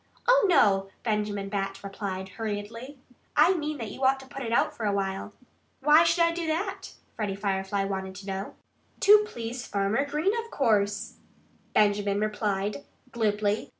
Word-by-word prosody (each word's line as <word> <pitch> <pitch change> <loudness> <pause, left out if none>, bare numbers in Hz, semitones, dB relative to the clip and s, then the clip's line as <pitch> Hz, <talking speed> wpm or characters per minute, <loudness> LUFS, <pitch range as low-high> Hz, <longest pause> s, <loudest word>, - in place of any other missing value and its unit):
"Oh, - - +5
no!" 195 - +4
Benjamin 210 -3 -1
Bat 195 -1 -3
replied 195 -1 -5
hurriedly. 225 +6 -5 0.4
"I 380 - +6
mean 305 -3 -3
that 225 -5 -5
you 265 - -7
ought 265 +1 +4
to - - -12
put 275 +1 -8
it 230 -3 -3
out 235 - +2
for 220 - -2
a - - +2
while." 195 0 -2 0.5
"Why 300 +4 +6
should 335 +1 +3
I 335 - +3
do 335 -1 -3
that?" 355 +5 -3 0.2
Freddie 205 -3 -2
Firefly 195 0 -1
wanted 190 -1 -4
to 195 +1 -10
know. 195 0 -5 0.5
"To 420 +1 +7
please 240 - -6
Farmer 200 +6 +1
Green, 305 +8 +1
of 460 - -13
course," 210 - 0 0.6
Benjamin 205 -1 +3
replied 210 +2 -1 0.3
glibly. 210 -2 0
210 Hz, 160 wpm, -27 LUFS, 200-275 Hz, 0.6 s, To